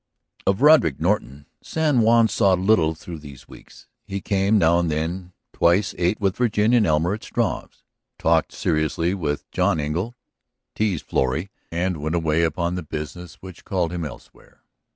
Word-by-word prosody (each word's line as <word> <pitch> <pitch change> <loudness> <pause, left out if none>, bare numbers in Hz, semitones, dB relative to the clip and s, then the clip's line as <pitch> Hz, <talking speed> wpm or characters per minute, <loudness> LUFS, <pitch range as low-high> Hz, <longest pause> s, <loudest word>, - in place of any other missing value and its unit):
Of 100 +7 +1
Roderick 150 - +5
Norton 70 +2 -1 0.2
San 155 -5 0
Juan 115 +1 +5
saw 100 -3 +2
little 90 -4 +2
through 80 0 -9
these 70 -4 -13
weeks. - - -15 0.2
He 100 0 -4
came 100 +2 +1
now 85 -2 +4
and 85 -1 0
then, 85 +4 -3 0.2
twice 90 +4 +2
ate 90 +4 0
with 95 -2 0
Virginia 115 0 +2
and 110 - +3
Elmer 80 +4 +1
at 110 - -6
Struve's, - - -3 0.3
talked - - +2
seriously 80 +3 0
with 75 -7 -3
John - - +1
Engle, 85 +11 -3 0.6
teased 105 -7 -1
Florrie, 80 +9 -1 0.2
and 90 +1 -1
went 80 +3 -2
away 80 -1 +1
upon 85 +2 0
the 90 - -3
business 80 +3 -7
which 95 -2 -11
called 90 -5 -1
him 85 -1 -3
elsewhere. 70 -5 -12
90 Hz, 160 wpm, -23 LUFS, 80-100 Hz, 0.6 s, Roderick